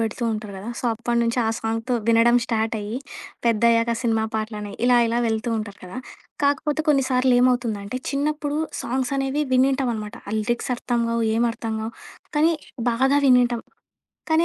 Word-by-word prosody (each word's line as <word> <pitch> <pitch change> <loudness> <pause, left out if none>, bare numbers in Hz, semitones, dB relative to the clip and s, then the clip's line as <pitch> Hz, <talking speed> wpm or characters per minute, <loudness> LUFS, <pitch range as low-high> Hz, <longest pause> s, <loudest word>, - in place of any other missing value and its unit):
పెడుతూ 225 +2 -2
ఉంటారు 215 -1 -5
కదా! 200 +5 -7
సో, - - -9
అప్పటి 235 +1 -1
నుంచి 235 +1 0
ఆ - - 0
సాంగ్‌తో 225 +2 -2
వినడం 230 +1 +5
స్టార్ట్ 225 -2 -1
అయ్యి, 210 +3 -4 0.5
పెద్దయ్యాక 230 +1 +3
సినిమా 225 -2 +1
పాటలని 215 -2 -3
ఇలా 250 0 +5
ఇలా 230 +1 0
వెళ్తూ 220 +1 -1
ఉంటారు 205 -2 -6
కదా! 185 +7 -7 0.4
కాకపోతే 285 +2 +1
కొన్నిసార్లు 260 -3 +3
ఏమవుతుందంటే, 240 -3 0
చిన్నప్పుడు 295 +1 -1 0.2
సాంగ్స్ 255 +2 -2
అనేవి 275 +2 0
విని 260 +1 +5
ఉంటాం 265 -2 0
అనమాట. 215 +1 -6
ఆ - - -4
లిరిక్స్ 240 +4 -2
అర్థంగావు, 235 -1 -1
ఏమి 235 +1 +3
అర్థంగావు 220 0 -4 0.4
కానీ 315 +3 +4 0.4
బాగా 265 +4 +3
వినింటాం. 245 -2 +4 0.7
కానీ 320 +1 +4
235 Hz, 155 wpm, -23 LUFS, 225-260 Hz, 0.7 s, వినడం